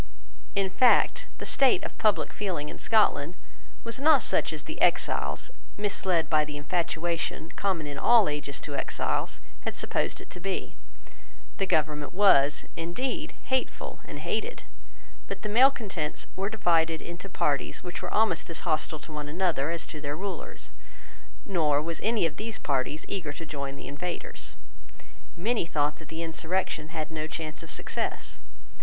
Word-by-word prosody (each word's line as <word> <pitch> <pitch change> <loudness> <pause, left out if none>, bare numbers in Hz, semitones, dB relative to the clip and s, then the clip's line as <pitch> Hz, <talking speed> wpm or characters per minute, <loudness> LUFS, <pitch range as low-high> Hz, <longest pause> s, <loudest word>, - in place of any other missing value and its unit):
In 195 -1 +2
fact, 250 +5 +4
the - - -6
state 270 -2 +4
of - - -5
public 215 -2 +2
feeling 175 -8 -2
in - - -8
Scotland 180 -7 +3 0.5
was 230 +2 -3
not 300 0 +6
such - - +2
as - - -5
the - - -7
exiles, - - +2 0.3
misled 190 -4 +1
by 155 -1 +4
the 150 -1 -5
infatuation 165 0 -1
common 185 -6 0
in 145 -1 -4
all 235 -4 +6
ages 145 -1 -1
to 145 - -5
exiles, - - -1 0.2
had - - -4
supposed - - 0
it - - -12
to - - -7
be. 190 +2 -3 0.8
The 195 - 0
government 150 -1 +1
was, 150 -8 +6
indeed, 250 - -2
hateful 260 0 -1
and - - -8
hated. 480 - -2 0.6
But - - -5
the 210 - -2
malecontents 215 - +2
were 195 +1 -1
divided 165 -6 +2
into 175 +3 -7
parties 145 -5 0
which 180 0 -5
were - - -4
almost 210 -7 +2
as 165 - -3
hostile 155 -1 0
to 155 - -10
one 150 -1 -4
another 165 -3 +1
as 170 0 -2
to 150 - -7
their 145 0 -2
rulers; 195 0 -5 0.7
nor 155 -7 +3
was 165 +2 -3
any 220 -4 +3
of 160 -1 -2
those 220 -1 -3
parties 140 +3 -1
eager 170 -7 -2
to 165 +3 -7
join 140 -2 -4
the - - -9
invaders. 170 +5 -4 0.8
Many 215 0 +1
thought 150 -2 +1
that 160 - -12
the 165 +1 -4
insurrection 165 0 -1
had 160 -1 -4
no 155 -1 -3
chance 155 -1 -4
of 165 - -8
success. - - -2
165 Hz, 160 wpm, -28 LUFS, 150-195 Hz, 0.8 s, not